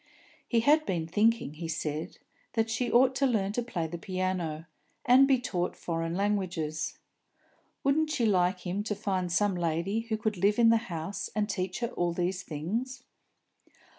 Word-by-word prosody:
He 230 -2 +2
had 300 +6 +4
been 170 -3 -1
thinking, 210 0 +2
he 165 +2 -6
said, 155 -1 -3 0.4
that 225 -1 0
she 240 +2 -1
ought 255 +2 +5
to 275 - +3
learn 205 -5 +1
to 245 - -1
play 200 -9 -3
the 170 +1 -5
piano, 185 -4 -2 0.4
and 260 +3 +7
be 265 -2 +4
taught 180 -7 -2
foreign 165 0 -3
languages. 180 -6 -1 0.9
Wouldn't 300 +3 +2
she 285 -6 0
like 185 -3 +2
him 185 +2 -2
to 210 - -1
find 190 -3 -2
some 205 +3 +2
lady 170 +4 -1
who 225 -1 -2
could 215 -2 -2
live 200 +3 +2
in 235 -1 +6
the 230 - +6
house 175 +5 -4
and 210 -1 +1
teach 185 0 -3
her 235 - 0
all 175 -7 -1
these 180 +2 -1
things? 225 - -4
195 Hz, 170 wpm, -29 LUFS, 175-230 Hz, 0.9 s, and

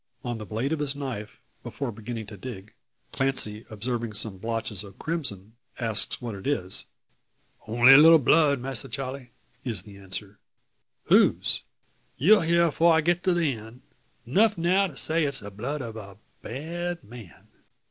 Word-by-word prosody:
On 120 -2 -3
the 105 - -8
blade 120 +8 -2
of 160 - -2
his 145 -1 0
knife, 130 -7 -6 0.2
before 140 -4 -5
beginning 115 +1 -6
to 105 +1 -10
dig, 105 -2 -9 0.4
Clancy 125 -5 -1
observing 115 +1 -3
some 100 -2 -1
blotches 110 -2 -2
of 100 -2 -13
crimson, 125 - -3 0.3
asks 115 -4 +1
what 120 -3 -5
it 100 +3 -8
is. 95 -11 -1 0.8
"Only 120 +4 +7
a 135 - +10
little 165 +2 +8
blood, 145 0 +3
Masser 130 -3 -2
Charle," 135 -1 -5 0.4
is 110 -8 0
the 100 -1 -13
answer. 100 +1 -4 0.6
"Whose?" - - +3 0.6
"You'll 205 - +5
hear 170 +1 +3
afore 165 +1 +3
I 160 - +4
get 175 +2 0
to 185 -2 +3
the 165 -5 +1
end. 115 +2 -12 0.4
Nuf 205 - +3
now 185 +4 +2
to 145 -7 -12
say 160 +1 +2
it's 140 -3 -1
the 100 0 -9
blood 130 +8 -4
of 115 -1 -7
a 100 -3 -10 0.2
bad 170 +7 -5
man." 110 -5 -14
125 Hz, 165 wpm, -26 LUFS, 110-150 Hz, 0.8 s, a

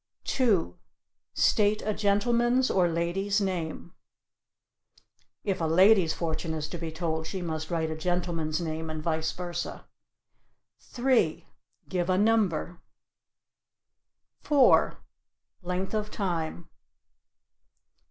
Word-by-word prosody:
2. 205 - +1 0.6
"State 210 0 +2
a 215 - 0
gentleman's 240 +5 +2
or 180 -2 +3
a - - -2
lady's 190 +5 0
name." 175 -3 -3 1.5
(If 195 -3 -1
a - - +1
lady's 185 +1 +5
fortune 160 0 -3
is 155 -1 -3
to 175 - -6
be 165 -1 -4
told 160 -1 -3
she 190 0 -4
must 155 -2 -4
write 160 -2 -1
a - - -3
gentleman's 165 -2 -1
name 160 -1 -4
and 155 -1 -5
vice 160 -1 0
versa.) 175 -1 -5 0.9
3. 240 -11 0 0.4
"Give 180 -1 -2
a 185 - +3
number." 200 -5 +1 1.6
4. 280 -4 +4 0.6
"Length 180 +2 -3
of 215 -1 -1
time." 170 -5 -3
175 Hz, 110 wpm, -28 LUFS, 160-205 Hz, 1.6 s, lady's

